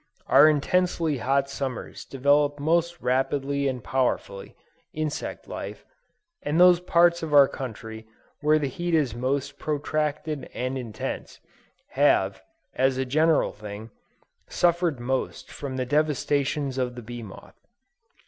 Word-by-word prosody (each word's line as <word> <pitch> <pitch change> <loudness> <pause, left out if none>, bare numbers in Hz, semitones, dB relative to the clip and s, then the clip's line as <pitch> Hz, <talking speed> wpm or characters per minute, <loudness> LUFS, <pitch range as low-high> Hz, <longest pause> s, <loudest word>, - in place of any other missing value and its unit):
Our 155 - +7
intensely 160 -1 +1
hot 135 +3 +1
summers 135 -3 -5
develop 145 +2 +2
most 170 +3 +1
rapidly 135 +2 0
and 125 -3 -3
powerfully, 125 -6 -2 0.4
insect 155 -1 -4
life, - - -7 0.6
and 150 +3 -1
those 180 -1 +7
parts 175 -1 +3
of 155 -2 -1
our 140 -1 +8
country 110 -4 -7 0.3
where 150 +1 +3
the 150 - -1
heat 175 +5 -2
is 140 -8 +1
most 135 +3 -2
protracted 150 -1 -2
and 130 +1 -2
intense, 120 -5 -5 0.5
have, - - +2 0.3
as 130 0 +1
a 130 - 0
general 155 +4 +2
thing, 105 +1 -9 0.6
suffered 170 -5 +1
most 130 +2 -3
from 135 -2 -6
the 130 - -1
devastations 145 -1 0
of 125 -1 -2
the 120 - -8
bee 120 +1 -7
moth. 100 -4 -12
140 Hz, 130 wpm, -25 LUFS, 130-155 Hz, 0.6 s, our